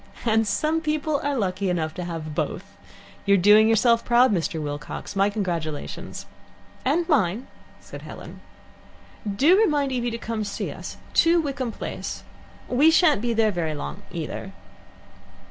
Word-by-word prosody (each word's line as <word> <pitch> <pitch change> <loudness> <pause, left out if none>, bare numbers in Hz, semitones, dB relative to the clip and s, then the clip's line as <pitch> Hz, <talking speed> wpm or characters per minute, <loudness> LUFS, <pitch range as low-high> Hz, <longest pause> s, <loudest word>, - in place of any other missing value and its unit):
"And 225 -1 +2
some 310 +10 0
people 305 -1 -1
are 285 -1 0
lucky 190 -2 -1
enough 160 -3 -1
to 180 - -5
have 165 -3 -5
both. - - -4 0.5
You're 200 0 +6
doing 210 +4 +6
yourself 230 +1 +4
proud, 240 -1 +4
Mr. 165 -3 -1
Wilcox. 150 +5 -6
My 195 +1 +3
congratulations." 170 -8 -4 0.6
"And 325 +6 +1
mine," 235 - +1 0.3
said - - -10
Helen. - - -10 1.0
"Do 305 - +5
remind 300 -10 +2
Evie 245 -2 -1
to 230 - -4
come 230 -1 -4
and 210 - -2
see 200 - -4
us - - -8 0.2
two, 340 +1 +4
Wickham 275 -6 -2
Place. - - -6 0.4
We 280 +6 +4
shan't 320 - +4
be 240 0 0
there 220 -1 +3
very 165 -4 -2
long, 70 - -6
either." - - -5
225 Hz, 150 wpm, -24 LUFS, 180-280 Hz, 1.0 s, You're